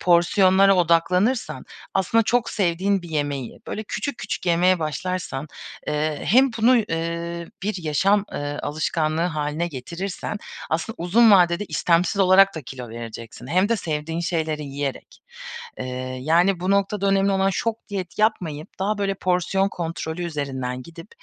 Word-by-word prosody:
porsiyonlara 190 +2 +5
odaklanırsan, 180 +7 +2 0.3
aslında 195 +4 +3
çok 240 +2 +1
sevdiğin 190 0 +1
bir 175 - -9
yemeği 145 -5 -3
böyle 215 - -4
küçük 280 +5 -4
küçük 210 -3 -4
yemeye 180 +2 +4
başlarsan, 155 -2 -3 0.4
eee, 150 0 -1
hem 260 +5 +5
bunu, 240 +3 +5
eee, 170 -3 -3 0.2
bir 200 -3 -2
yaşam, 195 +7 +2
eee, 145 0 -4
alışkanlığı 155 +1 -1
hâline 155 -1 -1
getirirsen 170 +8 -5 0.3
aslında 165 +7 -1
uzun 215 +7 +5
vadede 180 -1 +5
istemsiz 175 +3 +1
olarak 195 +1 +6
da 160 - -5
kilo 125 -1 -8
vereceksin. 115 +1 -8
Hem 185 +8 +2
de 230 - +2
sevdiğin 160 -2 -3
şeyleri 160 -3 -1
yiyerek. 140 -1 -5 0.6
Eee, 130 0 -4
yani 170 +6 +3
bu 185 - -1
noktada 200 0 +1
önemli 195 0 +3
olan 195 0 +2
şok 225 +3 -3
diyet 190 -4 -5
yapmayıp 170 -9 0
daha 205 +2 0
böyle 195 -1 0
porsiyon 185 +1 +1
kontrolü 165 -1 -4
üzerinden 130 -5 -3
gidip, 165 +5 -12
175 Hz, 140 wpm, -23 LUFS, 155-195 Hz, 0.6 s, olarak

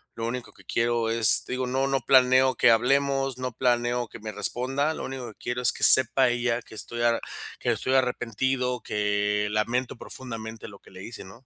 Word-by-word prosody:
lo 115 0 -4
único 125 +1 -6
que - - -21
quiero, 115 -1 0
es 115 -1 +4
te - - -6
digo, 130 0 -2
no 135 +2 0
no 135 -1 0
planeo 130 0 +4
que 120 - +4
hablemos, 135 +2 +1
no 130 0 -4
planeo 120 0 0
que - - -11
me 110 0 -7
responda. 135 +5 0
Lo - - -6
único 130 -2 -6
que 110 - -14
quiero 120 +1 -4
es 125 - +5
que - - -8
sepa 130 0 +5
ella 120 0 -1
que 110 - -15
estoy 120 +2 -5
a 120 -1 +2 0.4
que - - 0
estoy 130 - -2
arrepentido. 125 0 -1
Que 105 0 -1
lamento 120 +4 -2
profundamente 115 -3 -9
lo 100 -2 -13
que - - -20
le 95 0 -11
hice, 115 +2 -9
¿no? 115 +7 -16
120 Hz, 205 wpm, -25 LUFS, 115-130 Hz, 0.4 s, es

